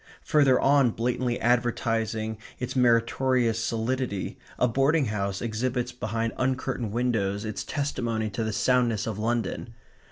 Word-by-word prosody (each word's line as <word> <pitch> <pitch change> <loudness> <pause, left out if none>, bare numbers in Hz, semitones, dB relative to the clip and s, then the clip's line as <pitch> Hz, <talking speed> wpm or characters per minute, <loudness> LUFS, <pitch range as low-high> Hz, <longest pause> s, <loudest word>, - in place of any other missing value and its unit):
Further 140 -4 +4
on, 140 -2 +4
blatantly 120 +2 -1
advertising 115 -2 0 0.2
its 125 - -4
meritorious 120 -1 +2
solidity, 115 -2 -2 0.2
a 125 - +3
boarding 135 +5 +2
house 100 -2 -2
exhibits 125 +2 -1
behind 115 -1 -2
uncurtained 130 -2 -1
windows 110 -4 0
its 110 -1 -4
testimony 120 -6 -2
to 110 +4 -2
the 110 - -1
soundness 120 -2 +2
of 110 -2 -4
London. 115 0 -2
120 Hz, 125 wpm, -27 LUFS, 110-125 Hz, 0.2 s, Further